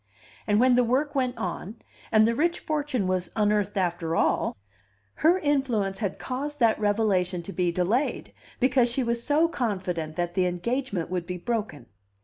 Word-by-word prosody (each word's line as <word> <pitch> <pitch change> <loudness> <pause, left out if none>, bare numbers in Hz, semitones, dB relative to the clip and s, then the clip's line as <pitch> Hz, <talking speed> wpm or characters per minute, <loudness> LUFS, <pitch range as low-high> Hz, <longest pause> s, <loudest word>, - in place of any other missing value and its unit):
And 210 0 +3
when 255 +1 +5
the 250 0 +4
work 265 +5 0
went 255 -3 0
on, 190 0 -4 0.4
and 215 0 +6
the 230 - +2
rich 340 +7 0
fortune 295 -8 -1
was 185 -1 -1
unearthed 210 -1 +1
after 170 -3 -1
all, - - +1 0.6
her 335 +4 +4
influence 260 - 0
had 200 -4 -2
caused 290 +3 -4
that 230 -3 +3
revelation 200 -4 +1
to 195 - -7
be 180 -2 +1
delayed 195 - -1 0.3
because 255 -1 +3
she 255 +2 -1
was 235 0 -1
so 305 +5 +3
confident 185 - -3
that 175 0 -2
the 185 -2 +2
engagement 180 -1 -2
would 180 -2 -2
be 180 0 -4
broken. 210 - -3
215 Hz, 165 wpm, -26 LUFS, 180-255 Hz, 0.6 s, and